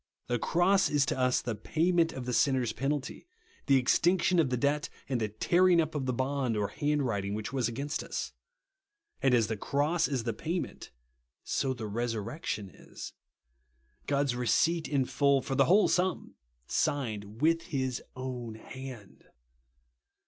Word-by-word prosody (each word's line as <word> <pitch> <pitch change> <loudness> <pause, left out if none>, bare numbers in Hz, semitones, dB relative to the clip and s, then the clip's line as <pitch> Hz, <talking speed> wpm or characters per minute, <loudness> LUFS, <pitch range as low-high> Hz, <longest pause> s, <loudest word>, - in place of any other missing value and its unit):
The 120 -1 -1
cross 180 - +3
is 145 -2 +3
to 130 - -2
us 125 0 +2
the 120 - -2
payment 165 - +1
of 130 -2 -6
the 125 - -2
sinner's 130 -3 +2
penalty, 140 - -3 0.4
the 135 -1 +6
extinction 175 +7 +3
of 150 -5 +3
the 125 - 0
debt, 145 +3 0 0.2
and 130 -3 -1
the 110 - +1
tearing 175 - +3
up 160 -1 0
of 140 -4 -2
the - - +2
bond 130 -2 -1
or 105 -1 0
hand 150 0 0
writing 100 -4 -1
which 110 +4 -5
was 130 -4 +1
against 140 +6 -3
us. - - -4 0.9
And 130 -2 +4
as 115 -2 +3
the 110 0 -3
cross 150 - +1
is 135 -5 -2
the 115 -1 -1
payment, 165 - -4 0.5
so 130 -1 -1
the 115 -3 -6
resurrection 110 - -3
is. - - -10 0.9
God's 140 -3 +1
receipt 155 +8 +2
in 140 -3 +1
full, 135 +2 +3
for 135 - -4
the 135 0 +4
whole 200 +7 +5
sum, 180 -1 0 0.3
signed 110 - -2
with 165 +1 +2
his 130 -6 -2
own 125 -3 -5
hand. 125 -2 -10
135 Hz, 160 wpm, -30 LUFS, 120-150 Hz, 0.9 s, the